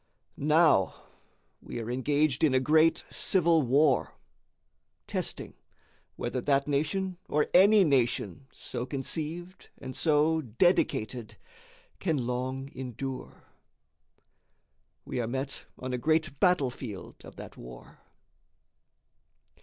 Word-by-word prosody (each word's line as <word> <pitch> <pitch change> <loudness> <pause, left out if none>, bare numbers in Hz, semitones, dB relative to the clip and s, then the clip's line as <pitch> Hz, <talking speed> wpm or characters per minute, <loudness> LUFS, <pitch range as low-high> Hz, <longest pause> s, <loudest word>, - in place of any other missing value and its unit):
Now 150 - +3 0.7
we 120 - -7
are 115 +1 -4
engaged 145 +2 +1
in 145 -4 +4
a - - +5
great 155 +4 +3
civil 170 -3 +3
war, 140 +1 +2 0.9
testing - - -4 0.6
whether 125 - -3
that 140 +1 +1
nation, 170 +6 -1
or 150 0 +1
any 200 +3 +7
nation 130 - 0
so 125 - -6
conceived 160 +6 -5
and 130 -1 -8
so 160 +1 +2
dedicated, 120 - 0 0.6
can 165 -5 0
long 130 +2 -3
endure. 130 +1 -7 1.6
We - - -4
are 115 - -2
met 135 +2 -4
on 130 0 -5
a 125 - -1
great 155 0 0
battle 180 -9 +3
field 110 -6 -9
of - - -12
that - - -10
war. - - -12
140 Hz, 105 wpm, -29 LUFS, 125-160 Hz, 1.6 s, any